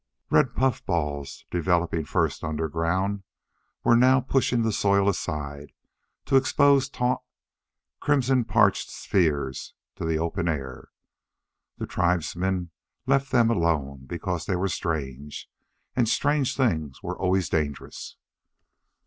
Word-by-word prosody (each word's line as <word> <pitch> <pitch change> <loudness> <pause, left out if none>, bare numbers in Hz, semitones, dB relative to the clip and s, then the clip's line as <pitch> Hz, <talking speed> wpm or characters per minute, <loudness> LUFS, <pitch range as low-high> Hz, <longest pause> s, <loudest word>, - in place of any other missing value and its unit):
Red - - +3
puffballs, 75 - -1
developing 85 -2 0
first - - 0
underground, 85 +6 -1 0.6
were 120 - +5
now 130 +2 +5
pushing 125 -2 +1
the 110 - +1
soil 100 -1 +2
aside 75 -6 -3 0.5
to 135 0 +4
expose 140 0 +4
taut, 125 -1 0 0.8
crimson 135 -3 +2
parchment - - +2
spheres 70 -8 -1 0.2
to - - -6
the 80 -1 +1
open 85 +1 -2
air. 70 -6 -4 0.9
The - - -4
tribesmen 90 +1 -1 0.3
left 135 +1 +2
them 115 -2 +4
alone 75 - 0
because 85 +1 -4
they 95 - +1
were 95 +2 0
strange; 75 -5 -4 0.5
and 120 -4 +2
strange 145 0 +1
things 80 - -1
were 90 -1 -3
always 95 -1 +1
dangerous. 75 -3 -3
90 Hz, 115 wpm, -26 LUFS, 80-120 Hz, 0.9 s, were